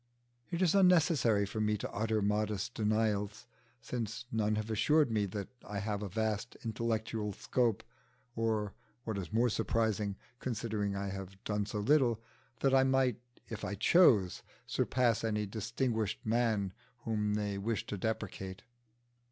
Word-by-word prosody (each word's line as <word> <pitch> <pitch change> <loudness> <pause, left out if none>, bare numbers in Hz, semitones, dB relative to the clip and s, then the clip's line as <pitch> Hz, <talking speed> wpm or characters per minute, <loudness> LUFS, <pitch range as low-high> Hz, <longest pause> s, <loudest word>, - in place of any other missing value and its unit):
It 175 +1 0
is 170 - +4
unnecessary 160 - +4
for 105 +2 -3
me 105 0 +2
to - - -5
utter 110 -1 0
modest 105 +1 0
denials, 105 -1 0 0.4
since 115 -1 -4
none 110 -1 +1
have 110 +1 -3
assured 145 +5 +3
me 105 -2 +1
that 100 0 -5
I 105 - -5
have 100 0 -2
a 105 - -4
vast 110 +3 -2
intellectual 110 -2 -2
scope, 115 +1 0 0.5
or 110 -3 0 0.3
what 110 -3 -3
is 90 - -6
more 115 +3 +3
surprising, 110 -3 0 0.2
considering 110 -4 -2
I 100 0 -2
have 95 0 -7
done 105 -1 -1
so 105 - -4
little 125 -2 +3 0.4
that 135 -1 +3
I 135 0 +6
might, 130 -3 +2 0.3
if 110 - -6
I 100 - -2
chose, 105 - +5 0.2
surpass 120 -3 +1
any 105 -2 0
distinguished 110 +1 -2
man 110 -4 +1 0.3
whom 105 -2 0
they 105 -2 -1
wish 110 +2 -1
to - - -4
depreciate. 95 -2 -4
110 Hz, 145 wpm, -33 LUFS, 105-115 Hz, 0.5 s, I